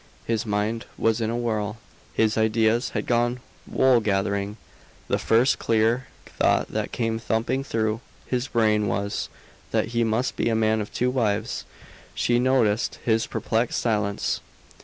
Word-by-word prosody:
His 115 Hz, -1 st, -1 dB
mind 105 Hz, +2 st, -1 dB
was 115 Hz, 0 st, +1 dB
in 110 Hz, -, 0 dB
a 115 Hz, -, -1 dB
whirl, 110 Hz, -2 st, -1 dB, 0.3 s
his 110 Hz, 0 st, +2 dB
ideas 110 Hz, +1 st, +2 dB
had -, -, -2 dB
gone 120 Hz, +1 st, +1 dB, 0.3 s
wool 130 Hz, -2 st, +4 dB
gathering. 100 Hz, 0 st, -1 dB, 0.5 s
The -, -, +1 dB
first 120 Hz, +3 st, +3 dB
clear 115 Hz, +3 st, +2 dB, 0.2 s
thought -, -, +1 dB
that -, -, -3 dB
came 115 Hz, -1 st, -1 dB
thumping 115 Hz, +4 st, -1 dB
through 110 Hz, -2 st, -1 dB, 0.2 s
his 125 Hz, 0 st, -1 dB
brain 110 Hz, -3 st, +2 dB
was, 100 Hz, +2 st, -2 dB, 0.4 s
that -, -, 0 dB
he 115 Hz, 0 st, +1 dB
must 115 Hz, +3 st, 0 dB
be -, -, 0 dB
a 115 Hz, -, +1 dB
man 110 Hz, 0 st, +2 dB
of 105 Hz, -, -6 dB
two 125 Hz, +1 st, 0 dB
wives. 110 Hz, -3 st, -1 dB, 0.5 s
She 120 Hz, 0 st, +2 dB
noticed 125 Hz, -4 st, +2 dB
his 110 Hz, -1 st, +2 dB
perplexed 115 Hz, +1 st, 0 dB
silence. 105 Hz, -3 st, 0 dB
115 Hz, 150 wpm, -25 LUFS, 110-120 Hz, 0.5 s, wool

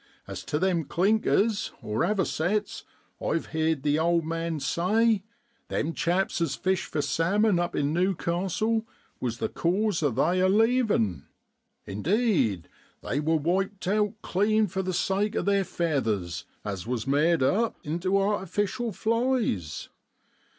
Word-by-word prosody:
As -, -, -7 dB
tu 150 Hz, +2 st, -2 dB
them 175 Hz, -2 st, +1 dB
clinkers 210 Hz, +4 st, +1 dB
(avocets), 190 Hz, -, -1 dB, 0.4 s
I've 165 Hz, -, 0 dB
heerd 160 Hz, -3 st, 0 dB
the 150 Hz, +1 st, +2 dB
old 170 Hz, 0 st, +2 dB
man 165 Hz, -1 st, -2 dB
say, 200 Hz, +9 st, +2 dB, 0.5 s
them 165 Hz, +3 st, -1 dB
chaps 180 Hz, +2 st, 0 dB
as 165 Hz, -4 st, 0 dB
fish 190 Hz, -1 st, 0 dB
for 150 Hz, -, -2 dB
salmon 190 Hz, +6 st, +2 dB
up 175 Hz, 0 st, -1 dB
in 145 Hz, +1 st, 0 dB
New 185 Hz, +3 st, +2 dB
castle 195 Hz, +7 st, -1 dB, 0.3 s
was 120 Hz, -2 st, -2 dB
the -, -, -1 dB
cause 190 Hz, +2 st, 0 dB
o' 145 Hz, -, +3 dB
they 155 Hz, +9 st, +1 dB
a 185 Hz, 0 st, +4 dB
leavin'! 215 Hz, -, +2 dB, 0.6 s
indeed, 135 Hz, -, +1 dB, 0.4 s
they 140 Hz, -, -1 dB
wor 160 Hz, +2 st, +2 dB
wiped 190 Hz, +5 st, -1 dB
out 210 Hz, +1 st, +1 dB
clean 215 Hz, +3 st, +2 dB
for 190 Hz, 0 st, -3 dB
the 185 Hz, 0 st, -2 dB
sake 200 Hz, +4 st, 0 dB
o' -, -, 0 dB
their 200 Hz, -1 st, +2 dB
feathers, 110 Hz, -, -1 dB, 0.2 s
as 100 Hz, -1 st, -4 dB
was 120 Hz, -2 st, -2 dB
made 150 Hz, +2 st, +3 dB
up 220 Hz, -, +2 dB
into 175 Hz, +6 st, 0 dB
artificial 205 Hz, +4 st, -1 dB
flies. 225 Hz, -, -1 dB
175 Hz, 135 wpm, -27 LUFS, 150-205 Hz, 0.6 s, a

